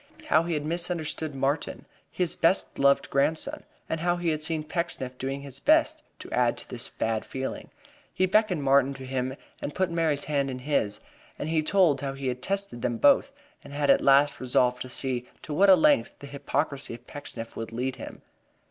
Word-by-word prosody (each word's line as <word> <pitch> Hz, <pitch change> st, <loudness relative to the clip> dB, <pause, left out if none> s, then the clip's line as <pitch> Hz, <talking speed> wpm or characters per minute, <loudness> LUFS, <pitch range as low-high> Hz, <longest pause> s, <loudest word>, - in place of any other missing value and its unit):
How 155 Hz, -, +5 dB
he 170 Hz, 0 st, -2 dB
had 150 Hz, -1 st, -3 dB
misunderstood 160 Hz, -3 st, -2 dB
Martin, 135 Hz, +3 st, -1 dB, 0.3 s
his 180 Hz, -3 st, 0 dB
best 170 Hz, +3 st, +1 dB
loved 140 Hz, 0 st, +3 dB
grandson, 145 Hz, +3 st, 0 dB, 0.3 s
and 160 Hz, -, -2 dB
how 175 Hz, +1 st, +1 dB
he 175 Hz, -1 st, -1 dB
had 155 Hz, -1 st, -1 dB
seen 155 Hz, 0 st, -1 dB
Pecksniff 150 Hz, -6 st, -3 dB
doing 135 Hz, +1 st, -3 dB
his 140 Hz, -1 st, -8 dB
best -, -, +3 dB, 0.2 s
to -, -, -11 dB
add -, -, +2 dB
to -, -, -6 dB
this -, -, -6 dB
bad 110 Hz, -1 st, -2 dB
feeling. 130 Hz, +2 st, -5 dB, 0.4 s
He 185 Hz, -, +1 dB
beckoned 185 Hz, -5 st, +2 dB
Martin 140 Hz, 0 st, +3 dB
to 130 Hz, -, -8 dB
him 130 Hz, 0 st, -2 dB, 0.3 s
and 145 Hz, -, -5 dB
put 185 Hz, -2 st, 0 dB
Mary's 160 Hz, -4 st, 0 dB
hand 140 Hz, -2 st, 0 dB
in 130 Hz, -, -4 dB
his, 125 Hz, -6 st, -1 dB, 0.4 s
as 150 Hz, -, -4 dB
he 160 Hz, -1 st, +2 dB
told 155 Hz, -5 st, +3 dB
how 135 Hz, -1 st, -3 dB
he 135 Hz, -1 st, -3 dB
had 125 Hz, 0 st, -4 dB
tested 195 Hz, -10 st, -3 dB
them 120 Hz, -2 st, -1 dB
both 280 Hz, -, +4 dB, 0.3 s
and 140 Hz, -, -11 dB
had 145 Hz, -1 st, +3 dB
at -, -, +4 dB
last 140 Hz, +1 st, +4 dB
resolved 125 Hz, 0 st, +1 dB
to 130 Hz, -, -5 dB
see 125 Hz, -1 st, -3 dB
to 150 Hz, -, -5 dB
what 195 Hz, +6 st, +5 dB
a 190 Hz, -, +10 dB
length 150 Hz, -8 st, +3 dB
the -, -, -11 dB
hypocrisy 140 Hz, -2 st, -3 dB
of 120 Hz, +1 st, -15 dB
Pecksniff 120 Hz, -6 st, -8 dB
would 115 Hz, 0 st, -5 dB
lead 130 Hz, +3 st, -3 dB
him. -, -, -9 dB
140 Hz, 200 wpm, -27 LUFS, 130-165 Hz, 0.4 s, a